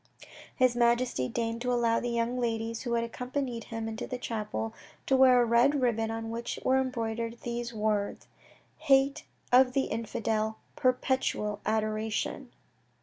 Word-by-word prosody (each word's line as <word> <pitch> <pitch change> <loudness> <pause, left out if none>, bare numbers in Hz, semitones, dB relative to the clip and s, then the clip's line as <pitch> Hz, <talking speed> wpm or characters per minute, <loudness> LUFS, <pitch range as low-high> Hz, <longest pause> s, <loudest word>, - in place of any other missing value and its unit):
His 255 -2 +3
Majesty 235 - +2
deigned 230 0 -2
to 250 0 0
allow 235 -1 +2
the 245 - -3
young 235 +1 -1
ladies 230 -1 -2
who 240 -2 -2
had 230 0 +1
accompanied 250 0 -4
him 225 -1 -5
into 220 0 -5
the 250 - -4
chapel 210 - -3 0.3
to 270 - +3
wear 260 -1 +6
a 240 - +4
red 240 +5 +4
ribbon 225 -3 +1
on 225 0 -4
which 235 +1 -4
were 265 0 +4
embroidered 230 -2 -3
these 240 0 -4
words, 210 -2 -1 0.5
"HATE 280 -1 +3 0.3
OF 250 0 +6
THE 270 - 0
INFIDEL. 220 -1 -1 0.2
PERPETUAL 255 -5 0
ADORATION." 215 0 -1
235 Hz, 145 wpm, -29 LUFS, 225-250 Hz, 0.5 s, wear